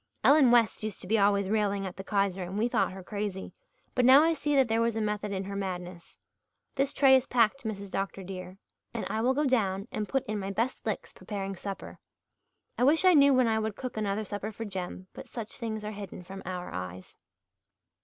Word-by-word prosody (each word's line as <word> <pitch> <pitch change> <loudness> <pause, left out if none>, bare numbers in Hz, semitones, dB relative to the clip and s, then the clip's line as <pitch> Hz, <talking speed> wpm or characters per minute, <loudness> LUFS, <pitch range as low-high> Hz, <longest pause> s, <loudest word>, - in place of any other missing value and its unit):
Ellen 285 -3 +6
West 235 -3 +4
used 215 -3 -4
to - - -8
be 220 +2 +2
always 200 -1 +3
railing 200 -1 0
at 185 - -6
the 195 - -7
Kaiser 195 -2 0
and 180 +2 -5
we 225 +3 +2
thought 245 - +1
her 190 0 -9
crazy, 200 -1 -4 0.4
but 250 - +2
now 265 +4 +8
I 330 +1 +3
see 295 -2 -1
that 265 -2 +4
there 225 0 +1
was 230 -1 +1
a - - -1
method 210 -1 -2
in 190 -1 -2
her 200 +1 -6
madness. 180 -3 -6 0.6
This 275 0 0
tray 270 -1 +6
is 260 0 +2
packed, 245 +2 +2
Mrs. 200 -3 -5
Dr. 195 0 -3
dear, 185 0 -8 0.4
and 230 - -2
I 220 - -1
will 255 +3 +2
go 295 +2 +1
down 200 -6 +1
and 210 -2 -3
put 270 - 0
in 210 0 -3
my 195 0 -4
best 230 +6 -2
licks - - -3
preparing 195 -2 -5
supper. 195 +2 -7 0.8
I - - +3
wish 310 +7 +4
I 370 - +7
knew 280 -2 +7
when 255 -2 +4
I 220 -1 +2
would 220 -1 -2
cook 255 +1 -6
another 215 0 -1
supper 205 +2 -4
for 225 +1 -6
Jem 185 -2 -5
but - - -10
such 230 -3 -7
things 220 -3 -4
are 210 - -3
hidden 200 -3 -8
from 190 +2 -9
our 180 -1 -5
eyes." 90 0 -7
210 Hz, 225 wpm, -29 LUFS, 195-240 Hz, 0.8 s, now